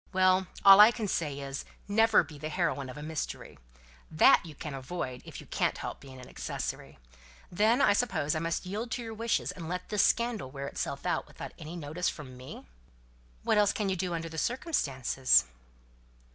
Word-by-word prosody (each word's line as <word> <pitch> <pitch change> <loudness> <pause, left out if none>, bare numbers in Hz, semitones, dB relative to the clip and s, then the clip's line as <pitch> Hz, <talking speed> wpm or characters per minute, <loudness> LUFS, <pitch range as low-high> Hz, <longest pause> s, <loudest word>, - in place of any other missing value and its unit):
"Well, 185 0 +3 0.2
all 195 0 +10
I 210 +1 +10
can 230 -3 -3
say 150 -6 -2
is, 140 0 -5 0.2
never 225 0 +4
be 150 -2 -12
the 155 +2 -4
heroine 150 -5 -1
of 130 - -9
a 150 - -7
mystery 155 - -5 0.5
that 155 - +5
you 160 -3 -10
can 150 +1 -6
avoid, 130 -2 -5
if - - -9
you - - -11
can't - - -1
help - - -6
being 130 -2 -12
an 125 - -11
accessory. - - -5 0.5
Then, 220 +8 +3
I - - +5
suppose, 205 -10 0
I 155 - -1
must 165 +3 -2
yield 210 +6 -4
to 245 0 -3
your 225 -1 -6
wishes 230 +1 -1
and 165 -3 -8
let 180 0 -4
this 210 -2 +2
scandal 235 - +1
wear 140 +1 -6
itself - - -4
out - - -1
without - - -9
any 155 +3 -8
notice 165 +2 -2
from 130 -5 -9
me?" 130 +1 -10 0.8
"What - - +3
else 205 -1 +3
can 205 -2 -1
you 190 - 0
do 180 -1 -2
under 165 0 -4
the 160 0 -5
circumstances?" 135 - +2
170 Hz, 195 wpm, -30 LUFS, 145-210 Hz, 0.8 s, all